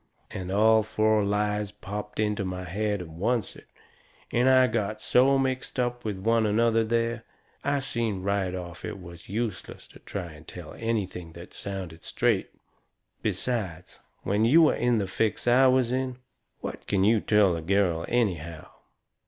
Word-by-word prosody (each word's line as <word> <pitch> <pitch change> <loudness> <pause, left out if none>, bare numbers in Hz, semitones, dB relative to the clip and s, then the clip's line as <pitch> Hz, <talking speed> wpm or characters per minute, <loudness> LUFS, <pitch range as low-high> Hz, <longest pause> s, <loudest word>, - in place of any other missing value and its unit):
And 95 0 -5
all 110 +2 +5
four 110 0 +2
lies 105 0 0
popped 105 +1 -7
into 105 -2 0
my 90 -1 -4
head 100 +2 -2
at - - -10
oncet, 105 +9 -2 0.6
and 130 +1 +4
got 110 -1 -1
so 130 +5 +4
mixed 130 -1 -2
up 120 0 -1
with 105 -3 -3
one 110 +3 +2
another 115 +1 +3
there, 115 0 0 0.4
I 140 0 +1
seen 115 -7 -2
right 95 -2 0
off 90 -1 -7
it - - -5
was 85 -1 -12
useless 105 -3 -4
to - - -15
try 90 -4 -6
to 75 -1 -13
tell 85 0 -10
anything 95 -7 -3
that 85 +1 -11
sounded 95 -5 -6
straight. - - 0 0.7
Besides, 95 -9 -3 0.2
when 105 +2 +1
you 155 +8 +6
are - - +1
in 120 -1 +2
the 100 - 0
fix 110 +5 -1
I 130 +2 +6
was 130 -2 +3
in, 130 -1 -1 0.4
what - - -6
can 95 -2 +2
you 110 +2 +4
tell 105 -4 +4
a 85 - -4
girl 90 -2 +1
anyhow? 85 -9 -1
105 Hz, 160 wpm, -27 LUFS, 95-115 Hz, 0.7 s, you